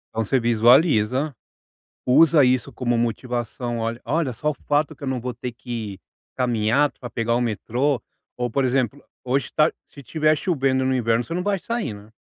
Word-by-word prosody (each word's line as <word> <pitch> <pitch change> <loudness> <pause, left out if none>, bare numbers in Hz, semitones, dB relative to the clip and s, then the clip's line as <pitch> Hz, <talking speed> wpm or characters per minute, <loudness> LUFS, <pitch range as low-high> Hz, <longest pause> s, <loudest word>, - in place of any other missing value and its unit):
Então 115 - +1
você 130 +5 +1
visualiza, 120 +3 +3 0.7
usa 150 +2 +6
isso 125 0 +1
como 120 -2 -1
motivação: 120 0 -2
"Olha 115 +1 -2
olha 145 +1 0
só 150 +6 -1
o - - -6
fato 150 +1 +1
que 145 - -32
eu - - -3
não 130 -1 -1
vou 125 +1 -4
ter 125 +1 -6
que 110 -4 -6 0.4
caminhar 125 +3 +2
para 120 - -9
pegar 115 0 -1
o 120 - +1
metrô". 120 +4 0 0.4
Ou 120 -2 -2
por 135 +2 +1
exemplo, 130 +1 0 0.2
hoje 130 +2 -1
tá 155 +1 +5
ch - - -16 0.2
se - - -10
estiver 155 +4 +1
chovendo 135 -7 +1
no 130 - +1
inverno, 115 -1 +1
você 165 - -6
não 180 - -1
vai 200 +1 0
sair, 230 - -3
né? 105 +2 -14
125 Hz, 190 wpm, -23 LUFS, 115-145 Hz, 0.7 s, usa